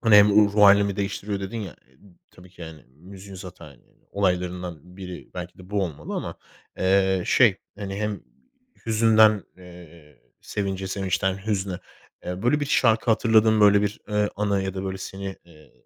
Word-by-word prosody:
hani 110 Hz, -3 st, +5 dB
hem 105 Hz, 0 st, +7 dB
ruh 105 Hz, -1 st, +4 dB
hâlimi 100 Hz, -1 st, +5 dB
değiştiriyor 100 Hz, 0 st, -3 dB
dedin 100 Hz, +4 st, -5 dB
ya, 95 Hz, -6 st, -8 dB, 0.5 s
tabii 90 Hz, +1 st, -17 dB
ki 90 Hz, -1 st, -13 dB
hani 80 Hz, -2 st, -12 dB
müziğin 95 Hz, +8 st, -13 dB
zaten 85 Hz, -8 st, -12 dB, 0.3 s
olaylarından 90 Hz, -3 st, -3 dB
biri 90 Hz, -2 st, -9 dB
belki 90 Hz, 0 st, -8 dB
de 95 Hz, +1 st, -14 dB
bu 105 Hz, -1 st, 0 dB
olmalı 85 Hz, -6 st, -5 dB
ama, -, -, -4 dB, 0.4 s
eee, 95 Hz, 0 st, +2 dB
şey 115 Hz, -7 st, +4 dB, 0.2 s
hani 100 Hz, -2 st, -5 dB
hem 105 Hz, -1 st, -3 dB, 0.7 s
hüzünden, 110 Hz, -2 st, +4 dB
eee, 85 Hz, -4 st, -15 dB, 0.2 s
sevince, 95 Hz, -1 st, -4 dB
sevinçten 95 Hz, 0 st, -2 dB
hüzne, 95 Hz, -4 st, -2 dB, 0.5 s
eee, 90 Hz, +2 st, -5 dB
böyle 125 Hz, +5 st, +2 dB
bir 145 Hz, -, -2 dB
şarkı 115 Hz, -3 st, +2 dB
hatırladığın 110 Hz, -1 st, +3 dB
böyle 100 Hz, 0 st, +5 dB
bir, 105 Hz, +1 st, -3 dB
eee, 105 Hz, -1 st, +1 dB
anı 100 Hz, -1 st, 0 dB
ya 95 Hz, -1 st, -4 dB
da 95 Hz, 0 st, -4 dB
böyle 95 Hz, 0 st, -4 dB
seni, 95 Hz, 0 st, -7 dB
eee, 80 Hz, -3 st, -20 dB
95 Hz, 160 wpm, -24 LUFS, 90-105 Hz, 0.7 s, hem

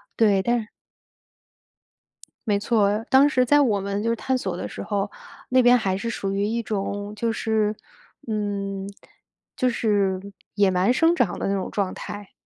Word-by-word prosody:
对， 205 Hz, -4 st, +3 dB
但 240 Hz, +3 st, +1 dB
是 215 Hz, -, -8 dB, 1.8 s
没 205 Hz, -1 st, +2 dB
错。 210 Hz, 0 st, +1 dB
当 275 Hz, +2 st, +6 dB
时 255 Hz, -3 st, +2 dB
在 290 Hz, +4 st, +4 dB
我 215 Hz, -8 st, +2 dB
们 200 Hz, +1 st, -3 dB
就 230 Hz, -, 0 dB
是 230 Hz, -, 0 dB
探 260 Hz, +2 st, -1 dB
索 190 Hz, -7 st, -3 dB
的 -, -, -4 dB
时 -, -, -7 dB
候， 205 Hz, -1 st, -2 dB, 0.4 s
那 255 Hz, 0 st, +5 dB
边 245 Hz, 0 st, +6 dB
还 190 Hz, -4 st, -1 dB
是 230 Hz, +3 st, -3 dB
属 195 Hz, -3 st, -3 dB
于 200 Hz, +1 st, 0 dB
一 230 Hz, +3 st, -1 dB
种 205 Hz, -1 st, -3 dB
就 230 Hz, +1 st, -1 dB
是， 220 Hz, -2 st, 0 dB, 0.5 s
嗯， 200 Hz, -2 st, -3 dB, 0.7 s
就 255 Hz, -2 st, +2 dB
是 200 Hz, -5 st, +1 dB, 0.4 s
野 200 Hz, -1 st, +3 dB
蛮 185 Hz, +6 st, +2 dB
生 330 Hz, +5 st, +3 dB
长 230 Hz, -, 0 dB
的 -, -, -2 dB
那 200 Hz, -, 0 dB
种 190 Hz, -, -3 dB
状 195 Hz, -3 st, -2 dB
态。 205 Hz, -1 st, -8 dB
210 Hz, 190 characters per minute, -24 LUFS, 200-235 Hz, 1.8 s, 当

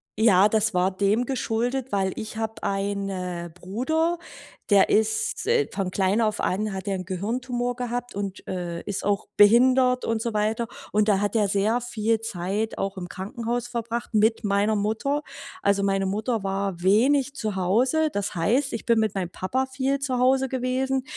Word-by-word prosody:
ja, 205 Hz, -3 st, +5 dB
das 220 Hz, -1 st, +1 dB
war 180 Hz, +1 st, +2 dB
dem 205 Hz, +5 st, +2 dB
geschuldet, 245 Hz, +1 st, -2 dB
weil 190 Hz, -2 st, 0 dB
ich 220 Hz, -1 st, -6 dB
habe 220 Hz, 0 st, -4 dB
eine 195 Hz, -3 st, -3 dB
Bruder, 315 Hz, -, -1 dB, 0.5 s
der 200 Hz, -2 st, +5 dB
ist, 435 Hz, -, +1 dB
äh 465 Hz, -2 st, +3 dB
von 195 Hz, -2 st, -2 dB
klein 195 Hz, +4 st, +1 dB
auf 215 Hz, -1 st, 0 dB
an 210 Hz, +3 st, -1 dB
hat 190 Hz, 0 st, -5 dB
der 200 Hz, -1 st, -1 dB
'n -, -, -5 dB
Gehirntumor 245 Hz, +6 st, -2 dB
gehabt 245 Hz, 0 st, -4 dB
und, 200 Hz, -1 st, -5 dB
äh, 175 Hz, -2 st, -4 dB
ist 200 Hz, -2 st, -4 dB
auch 200 Hz, -1 st, 0 dB
behindert 250 Hz, +4 st, +5 dB
und 225 Hz, -1 st, -1 dB
so 235 Hz, -, -2 dB
weiter. 215 Hz, +2 st, 0 dB, 0.2 s
Und 210 Hz, +1 st, +2 dB
da 200 Hz, -2 st, +3 dB
hat 205 Hz, +1 st, -1 dB
er 210 Hz, -2 st, +3 dB
sehr 205 Hz, +5 st, +1 dB
viel 225 Hz, -2 st, 0 dB
Zeit 210 Hz, 0 st, -3 dB
auch 195 Hz, 0 st, -3 dB
im 180 Hz, -1 st, -6 dB
Krankenhaus 235 Hz, +5 st, -4 dB
verbracht 235 Hz, 0 st, -4 dB
mit 220 Hz, +2 st, +3 dB
meiner 205 Hz, +1 st, +2 dB
Mutter. 220 Hz, +8 st, -1 dB, 0.4 s
Also, 200 Hz, 0 st, +3 dB
meine 195 Hz, 0 st, +1 dB
Mutter 215 Hz, +3 st, -1 dB
war 195 Hz, -2 st, -2 dB
wenig 260 Hz, +8 st, +3 dB
zu 215 Hz, -6 st, -3 dB
Hause. 245 Hz, -, +2 dB
Das 205 Hz, -5 st, -3 dB
heißt, 245 Hz, -, +1 dB
ich 230 Hz, -, -4 dB
bin 230 Hz, -1 st, +3 dB
mit 215 Hz, -2 st, 0 dB
meinem 180 Hz, -3 st, -2 dB
Papa 255 Hz, +10 st, -1 dB
viel 265 Hz, +1 st, -1 dB
zu 265 Hz, -3 st, -2 dB
Hause 265 Hz, +1 st, +3 dB
gewesen. 260 Hz, +1 st, -1 dB
220 Hz, 175 wpm, -25 LUFS, 195-245 Hz, 0.5 s, ja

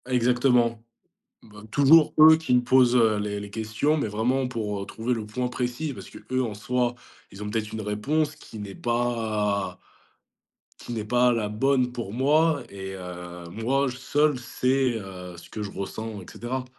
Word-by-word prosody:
Ah 130 Hz, -, -5 dB
exactement. 125 Hz, -2 st, +2 dB, 0.6 s
Bah 105 Hz, -1 st, -14 dB
toujours 150 Hz, +2 st, +6 dB
eux 160 Hz, +1 st, +10 dB
qui 160 Hz, -5 st, -1 dB
me 125 Hz, -, +5 dB
posent, 125 Hz, 0 st, +4 dB
heu, 110 Hz, -3 st, +4 dB
les 105 Hz, 0 st, -3 dB
les 100 Hz, 0 st, -7 dB
questions, 110 Hz, +8 st, 0 dB
mais 140 Hz, -, -1 dB
vraiment 125 Hz, +5 st, 0 dB
pour, 105 Hz, -5 st, -3 dB
heu, -, -, -5 dB
trouver 115 Hz, +5 st, -2 dB
le 110 Hz, -3 st, -3 dB
point 125 Hz, +4 st, -2 dB
précis. 125 Hz, +4 st, -3 dB
Parce 100 Hz, -5 st, -10 dB
qu'eux, 130 Hz, +4 st, -3 dB
en 115 Hz, -4 st, -3 dB
soi, 120 Hz, +3 st, -1 dB, 0.4 s
ils 100 Hz, -, -11 dB
ont 105 Hz, -, -4 dB
peut-être 105 Hz, 0 st, -2 dB
une 110 Hz, -, -5 dB
réponse 145 Hz, +9 st, -1 dB
qui 115 Hz, -7 st, -11 dB
n'est 100 Hz, -2 st, -7 dB
pas 110 Hz, -6 st, -1 dB, 1.0 s
qui 120 Hz, -, -7 dB
n'est 110 Hz, -2 st, -3 dB
pas 125 Hz, +2 st, +3 dB
la 110 Hz, -3 st, -1 dB
bonne 125 Hz, +3 st, +1 dB
pour 115 Hz, -5 st, -6 dB
moi 145 Hz, +3 st, +3 dB
et 95 Hz, -1 st, -7 dB
heu, 90 Hz, -1 st, -8 dB
moi 130 Hz, +9 st, 0 dB
seul, 140 Hz, +2 st, +1 dB
c'est, 125 Hz, 0 st, 0 dB
heu, 90 Hz, -3 st, -9 dB
ce -, -, -13 dB
que 110 Hz, -, -6 dB
je 100 Hz, -, -6 dB
ressens 110 Hz, +1 st, -5 dB
et -, -, -12 dB
cetera. 125 Hz, +2 st, -4 dB
120 Hz, 180 wpm, -25 LUFS, 105-130 Hz, 1.0 s, eux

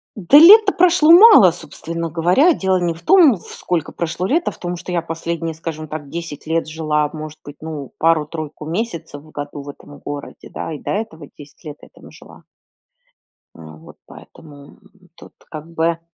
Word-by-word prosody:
Да 210 Hz, +8 st, +4 dB
лет-то 405 Hz, +4 st, +8 dB
прошло 345 Hz, -3 st, +4 dB
мало, 350 Hz, -, +8 dB
собственно 165 Hz, 0 st, -6 dB
говоря. 180 Hz, -, +2 dB
Дело 190 Hz, -5 st, 0 dB
не 175 Hz, -2 st, -1 dB
в 165 Hz, -, -14 dB
том, 325 Hz, -, +5 dB
вф 175 Hz, -, -15 dB
сколько 170 Hz, -4 st, -3 dB
прошло 170 Hz, +2 st, -4 dB
лет, 330 Hz, -, -1 dB
а -, -, 0 dB
в -, -, -16 dB
том, 175 Hz, 0 st, -5 dB
что 175 Hz, -, -9 dB
я 175 Hz, -2 st, -1 dB
последние, 165 Hz, 0 st, -5 dB
скажем 155 Hz, -1 st, -7 dB
так, 150 Hz, -2 st, -8 dB
10 165 Hz, -3 st, -8 dB
лет 165 Hz, 0 st, -1 dB
жила, 155 Hz, -2 st, -2 dB
может 155 Hz, 0 st, -9 dB
быть, 145 Hz, 0 st, -12 dB
ну 155 Hz, -4 st, -8 dB
пару-тройку 155 Hz, -1 st, -2 dB
месяцев 165 Hz, -5 st, -5 dB
в 155 Hz, 0 st, -19 dB
году 145 Hz, 0 st, -7 dB
в 140 Hz, -, -11 dB
этом 145 Hz, 0 st, -13 dB
городе, 145 Hz, 0 st, -9 dB
да, 160 Hz, -, -6 dB
и 150 Hz, -, -8 dB
до -, -, -6 dB
этого 195 Hz, -8 st, -5 dB
10 145 Hz, +3 st, -16 dB
лет 150 Hz, -2 st, -9 dB
я -, -, -16 dB
там -, -, -16 dB
жила. -, -, -17 dB, 1.1 s
Э, -, -, -17 dB
вот 80 Hz, 0 st, -14 dB
поэтому, 145 Hz, -3 st, -16 dB, 0.4 s
тут -, -, -16 dB, 0.2 s
как 155 Hz, 0 st, -9 dB
бы. 165 Hz, 0 st, -1 dB
165 Hz, 185 wpm, -18 LUFS, 150-180 Hz, 1.1 s, лет-то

